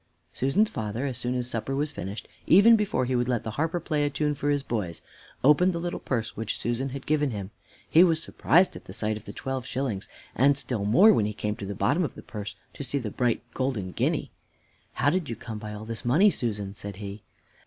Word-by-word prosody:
Susan's 185 - +2
father, 110 +4 -3
as 130 -3 -2
soon 120 +1 -2
as 125 -1 -1
supper 120 +2 -2
was 145 +2 -1
finished, 100 0 -6 0.2
even 205 +7 +8
before 210 - +1
he 130 +1 0
would 120 0 +1
let 120 -3 0
the 110 - -4
harper 160 +8 -1
play 150 -3 -1
a 145 - +2
tune 150 +1 0
for 145 +1 -2
his 145 -1 +1
boys, 100 - -3 0.4
opened 165 +7 +5
the 170 - -2
little 175 +1 -3
purse 115 -3 -2
which 110 -1 -3
Susan 120 +3 -1
had 135 +1 -7
given 150 -1 +2
him. 100 -4 -5 0.4
He 165 - +7
was 165 -3 +3
surprised 175 +2 +3
at - - -10
the 95 - -9
sight 110 +1 0
of 110 +1 -9
the - - -7
twelve 135 -1 -4
shillings, 125 -8 -3 0.2
and 140 +3 +4
still 120 -7 -2
more, 190 - +7
when 105 - +2
he 105 - -3
came 105 0 -2
to 100 - -6
the 100 - -4
bottom 145 - +2
of 145 - -3
the - - -10
purse 105 -2 -6 0.2
to - - -6
see 140 +2 -1
the 115 -6 -3
bright 120 +1 0
golden 125 -9 -2
guinea. - - -1 0.6
"How 145 - +2
did 180 -3 -1
you 115 - -3
come 110 -2 -7
by 105 0 -7
all 105 +1 -7
this 115 0 -5
money, 165 +13 +5
Susan?" 105 - -3
said 100 -1 -7
he. 100 +1 -7
125 Hz, 235 wpm, -27 LUFS, 105-145 Hz, 0.6 s, even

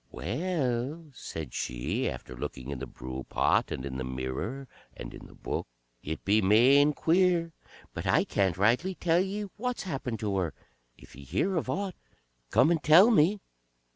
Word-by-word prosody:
"Well," 135 - -2
said 80 - -7
she, - - -2
after 65 0 -8
looking 65 +2 -6
in 70 - -5
the 65 - -5
brewpot, 65 +2 -1
and 65 - -4
in 65 -1 -5
the - - -2
mirror, 65 - -4 0.3
and - - -8
in - - -11
the - - -16
Book, - - -4 0.3
"it 80 +2 -6
be 105 +2 +4
main 130 +9 +5
queer, 170 +1 +2 0.4
but - - -5
I - - +4
can't 95 -3 0
rightly 125 - +2
tell 170 0 +2
ye 195 +3 -2
what's 250 +2 -3
happened 135 - -4
to 100 -2 -1
her. 85 -5 -1 0.4
If - - -16
ye 70 - -11
hear 185 - -1
of 160 -6 -1
aught, 195 +6 -2 0.6
come 155 - +4
and 165 -2 +1
tell 175 +11 +7
me." 195 +1 +3
125 Hz, 170 wpm, -29 LUFS, -, 0.6 s, tell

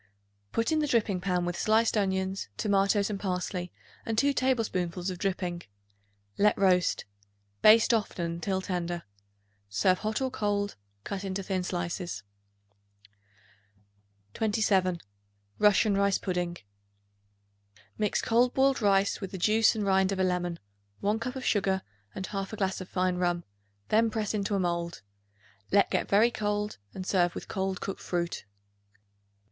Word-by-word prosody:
Put 230 +6 0
in 315 - +2
the 300 - +1
dripping 210 -8 +1
pan 180 -2 0
with 175 0 -2
sliced 220 +5 +2
onions, 190 -1 -1
tomatoes 200 0 +2
and 200 - -3
parsley 180 -2 -3 0.3
and 225 -1 -3
2 280 +4 +3
tablespoonfuls 195 -9 0
of 180 - -7
dripping. 180 -3 -2 0.8
Let 210 0 +4
roast; 180 -3 +2 0.6
baste 220 +2 +7
often 205 -6 -1
until 175 +3 -2
tender. 175 -2 -3 0.7
Serve 145 - +2
hot 215 0 -1
or 260 -1 -1
cold, 205 -3 -1 0.3
cut 200 - -4
into 195 0 -3
thin 190 -1 -1
slices. 175 - -3 2.1
27. 200 -5 +1 0.6
Russian 210 0 +4
Rice 200 0 +2
Pudding. 180 -2 -2 1.4
Mix 210 -1 0
cold 245 +2 +3
boiled 270 -1 +3
rice 200 0 +2
with 195 - -4
the 190 - -6
juice 220 +5 +4
and 210 -2 -1
rind 190 0 +3
of 195 - -1
a - - +3
lemon, 175 -2 0 0.4
1 210 +2 +1
cup 250 +3 -4
of 260 - -5
sugar 190 -2 +1 0.3
and 190 - -4
1/2 195 +1 -4
glass 190 -1 -1
of 185 - -8
fine 185 -1 0
rum; 175 -1 0 0.5
then 225 +1 +4
press 215 -2 -2
into 205 -1 -1
a - - +1
mold. 170 - -2 0.7
Let 200 0 +4
get - - 0
very 215 +4 +5
cold 210 - -2
and 185 - -6
serve 175 -2 +2
with - - -6
cold 190 -1 -2
cooked 195 - -5
fruit. 170 - -3
195 Hz, 145 wpm, -29 LUFS, 180-215 Hz, 2.1 s, baste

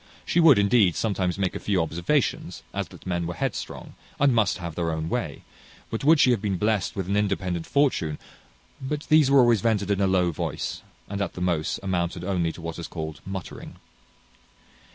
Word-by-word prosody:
She 175 - +1
would, 160 -7 +7
indeed, 100 -3 +4
sometimes 95 -5 -1
make 95 -2 -1
a - - -3
few 100 -3 0
observations, 85 +1 -1
as - - -2
that - - -15
men 85 -2 -1
were 85 - -4
headstrong, - - -4 0.3
and 140 -2 +4
must 110 -4 +2
have 85 -3 -6
their 85 0 -2
own 80 0 -3
way, - - -1
and - - -16 0.5
would 115 - -3
wish 155 +1 +5
she 125 - +5
had 115 -5 +1
been 100 -3 -1
blest 105 0 0
with 95 -3 -3
an 100 - 0
independent 95 -5 -1
fortune; 130 - +1 0.6
but 145 +3 -3
these 155 -3 +5
were 140 -1 +6
always 120 -4 +4
vented 105 -3 +1
in 100 0 +1
a 100 - +3
low 90 -2 +2
voice, 75 - -4 0.3
and 100 0 -4
at 95 - -2
the - - -8
most 85 -4 0
amounted 90 -2 -2
only 90 -3 0
to 85 - -11
what 85 +1 -5
is 85 - -5
called 80 -3 -6
muttering. 95 -2 -7
95 Hz, 200 wpm, -25 LUFS, 85-110 Hz, 0.6 s, would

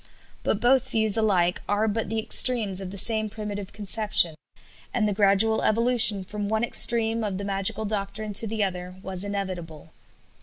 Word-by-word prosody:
But 205 - -1
both 260 +2 +2
views 220 -4 +2
alike 185 -6 +1
are 205 +2 +1
but 220 -1 -2
the 225 - -3
extremes 220 -3 +1
of 190 - -6
the 200 - -9
same 215 +2 +1
primitive 205 -2 -7
conception; 210 -4 0 0.6
and 220 -3 0
the 205 - -1
gradual 205 +2 +3
evolution 230 -3 +3
from 205 +2 -5
one 220 +1 0
extreme 230 -1 +3
of 200 -3 -3
the 200 - -5
magical 195 +2 -1
doctrine 210 0 -4
to 220 +3 +4
the 215 0 -1
other 180 -1 -4
was 190 0 -4
inevitable. 180 -6 -6
210 Hz, 165 wpm, -25 LUFS, 195-220 Hz, 0.6 s, to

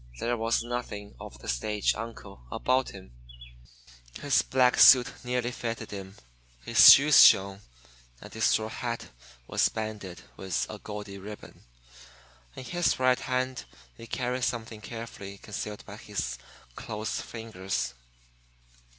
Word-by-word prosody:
There 120 +1 -1
was 115 0 0
nothing 120 -4 -6
of 60 - -10
the - - -13
stage 105 - 0
"uncle" 105 - -9
about 130 +1 0
him: 95 -10 -12 1.1
his 145 - +3
black 130 -1 +2
suit 125 -2 +8 0.2
nearly 125 0 -2
fitted 115 -2 -5
him; 95 -1 -8 0.5
his - - +9
shoes 145 +1 +8
shone, 100 0 +5 0.6
and - - -12
his 110 0 0
straw 110 0 +2
hat 120 +1 -5 0.4
was - - +1
banded 105 -5 -6
with 95 -3 -2
a - - -8
gaudy 105 -2 -8
ribbon. 105 +2 -11 0.9
In - - -8
his 175 +6 0
right 130 -1 +3
hand 130 0 -2 0.3
he 115 - -12
carried 125 +1 -3
something 110 -3 -3
carefully 100 -3 -8
concealed 105 +1 -7
by 105 0 -10
his 85 - -5 0.4
closed 110 -1 -4
fingers. 95 - -4
110 Hz, 130 wpm, -28 LUFS, 100-125 Hz, 1.1 s, his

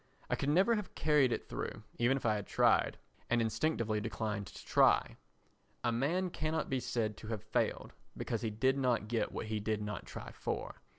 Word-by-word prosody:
I - - +4
could 140 - -1
never 190 +9 +5
have 210 -3 -3
carried 150 -5 +4
it - - -2
through, - - -5 0.2
even 125 +3 +3
if 135 - -6
I 110 - +4
had 105 -2 -3
tried, - - +3 0.3
and 120 - +3
instinctively 115 -2 0
declined 105 -2 -3
to 95 - -11
try. - - +4 0.7
A 120 - +2
man 165 +10 0
cannot 155 -1 -1
be 130 - +2
said 110 -3 -1
to 110 - -9
have 110 -3 -3
failed, - - -1 0.2
because 115 -3 -2
he 115 - 0
did 130 +6 +1
not 125 -5 +1
get 115 0 0
what - - -4
he 110 0 -2
did 105 0 -1
not 105 -1 -5
try - - -7
for. - - -4
115 Hz, 195 wpm, -34 LUFS, 110-140 Hz, 0.7 s, never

